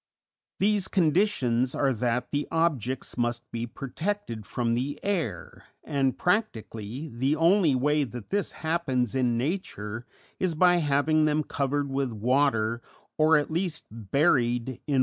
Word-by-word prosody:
These 205 Hz, -1 st, +2 dB
conditions 150 Hz, -, +2 dB
are 135 Hz, -2 st, +2 dB
that 125 Hz, +1 st, -1 dB
the 145 Hz, 0 st, -1 dB
objects 135 Hz, -8 st, -1 dB
must 120 Hz, 0 st, 0 dB
be 115 Hz, 0 st, -3 dB
protected 135 Hz, -, -4 dB
from 120 Hz, -2 st, -1 dB
the 130 Hz, +4 st, -2 dB
air, 165 Hz, -, -3 dB, 0.2 s
and, 135 Hz, -2 st, 0 dB
practically, 135 Hz, -, -2 dB
the 135 Hz, +3 st, 0 dB
only 165 Hz, -2 st, +4 dB
way 150 Hz, +3 st, +2 dB
that 120 Hz, -4 st, -9 dB
this 205 Hz, -1 st, 0 dB
happens 135 Hz, -8 st, 0 dB
in 125 Hz, -3 st, +1 dB
nature 120 Hz, -, -3 dB, 0.3 s
is 180 Hz, -4 st, 0 dB
by 175 Hz, +2 st, +5 dB
having 155 Hz, 0 st, +2 dB
them 155 Hz, 0 st, +2 dB
covered 140 Hz, 0 st, -1 dB
with 135 Hz, -2 st, -1 dB
water, 115 Hz, -1 st, +1 dB, 0.4 s
or 155 Hz, +1 st, +6 dB
at 150 Hz, +1 st, -1 dB
least 170 Hz, -1 st, -1 dB
buried 120 Hz, -, +1 dB
in 130 Hz, -, -5 dB
wet -, -, -25 dB
ground. 140 Hz, -3 st, +2 dB
140 Hz, 145 wpm, -27 LUFS, 120-160 Hz, 0.4 s, or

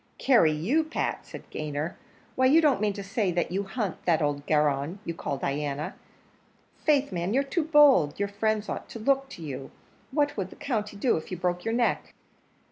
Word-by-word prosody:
"Carry 230 Hz, -, +4 dB
you, 205 Hz, -, +1 dB
Pat!" 315 Hz, -, -3 dB
said -, -, -10 dB
Gayner; 150 Hz, +2 st, -3 dB, 0.4 s
"why, 260 Hz, 0 st, +4 dB
you 300 Hz, +5 st, +6 dB
don't 290 Hz, -10 st, +3 dB
mean 210 Hz, -1 st, +1 dB
to 200 Hz, -, -6 dB
say 195 Hz, -5 st, 0 dB
you 195 Hz, +2 st, -1 dB
hunt 195 Hz, -2 st, -4 dB
that 170 Hz, -3 st, +3 dB
old 145 Hz, -2 st, -1 dB
garron 150 Hz, +2 st, +1 dB
you 170 Hz, -, -3 dB
call 140 Hz, -, -4 dB
Diana? 145 Hz, +1 st, -2 dB, 0.8 s
Faith, 285 Hz, -4 st, +1 dB
man, 180 Hz, +4 st, -1 dB
you're 275 Hz, -, +3 dB
too 305 Hz, +3 st, -1 dB
bold; 285 Hz, -, +5 dB
your 200 Hz, -, +1 dB
friends 215 Hz, +1 st, -1 dB
ought -, -, -5 dB
to -, -, -7 dB
look 270 Hz, +4 st, +1 dB
to 170 Hz, -, -9 dB
you; 135 Hz, -3 st, -6 dB, 0.4 s
what 290 Hz, +1 st, +1 dB
would 190 Hz, -3 st, -3 dB
the -, -, -13 dB
country 210 Hz, -6 st, -3 dB
do 235 Hz, 0 st, +2 dB
if 160 Hz, -, -7 dB
you 185 Hz, -, -4 dB
broke 180 Hz, 0 st, -1 dB
your 225 Hz, -, -1 dB
neck?" 240 Hz, -1 st, 0 dB
200 Hz, 195 wpm, -27 LUFS, 155-260 Hz, 0.8 s, you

